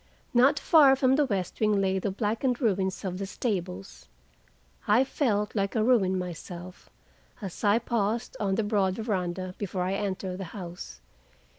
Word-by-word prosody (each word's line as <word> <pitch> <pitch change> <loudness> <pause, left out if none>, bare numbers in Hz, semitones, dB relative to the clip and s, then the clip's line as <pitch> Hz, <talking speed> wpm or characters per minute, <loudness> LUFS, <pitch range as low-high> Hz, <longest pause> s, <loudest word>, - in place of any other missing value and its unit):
Not 260 +4 +5
far 285 -3 +6
from 260 0 +3
the 290 0 +2
west 190 -6 -3
wing 215 -2 +2
lay 190 -1 +1
the 200 - -2
blackened 225 +5 -1
ruins 190 -5 0
of 185 0 -3
the 195 - -3
stables. 190 -3 -4 0.8
I 215 +5 +5
felt 215 -7 0
like 200 -1 -1
a 220 - +2
ruin 205 -6 +3
myself, 180 0 -7 0.5
as 195 -6 -7
I 205 +1 +4
paused 230 -1 -1
on 195 -2 0
the 225 - 0
broad 200 -3 +1
veranda 185 -4 -3
before 190 -2 -2
I 185 +1 -1
entered 190 -2 -3
the 190 - -4
house. 175 - -8
200 Hz, 160 wpm, -27 LUFS, 185-225 Hz, 0.8 s, far